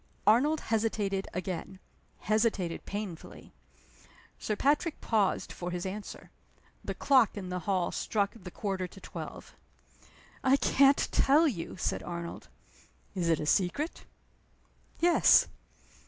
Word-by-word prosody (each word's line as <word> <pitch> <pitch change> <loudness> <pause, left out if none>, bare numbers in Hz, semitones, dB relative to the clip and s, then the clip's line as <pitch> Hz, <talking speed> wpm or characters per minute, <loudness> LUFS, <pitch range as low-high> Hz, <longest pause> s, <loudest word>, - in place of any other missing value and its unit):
Arnold 285 +8 +4
hesitated 210 -3 -1
again 185 +1 -5 0.4
hesitated 215 -5 0
painfully. 200 -5 -7 0.9
Sir 215 - -2
Patrick 295 - +1
paused 210 -4 0
for 175 - -5
his 175 0 -4
answer. 200 +2 -7 0.5
The - - -4
clock 260 -7 +3
in 185 -2 -5
the 180 0 -2
hall 185 -3 +1
struck 200 -2 -1
the 190 -5 -10
quarter 190 -1 -3
to 195 - -14
twelve. - - -9 0.9
"I 265 +1 +5
can't 275 +2 +4
tell 300 +4 +4
you!" 185 - -4
said - - -1
Arnold. 170 -1 -6 0.7
"Is 175 -4 -1
it 165 - +3
a - - -3
secret?" 200 - 0 0.9
"Yes." 345 +1 +6
205 Hz, 120 wpm, -30 LUFS, 180-250 Hz, 0.9 s, Yes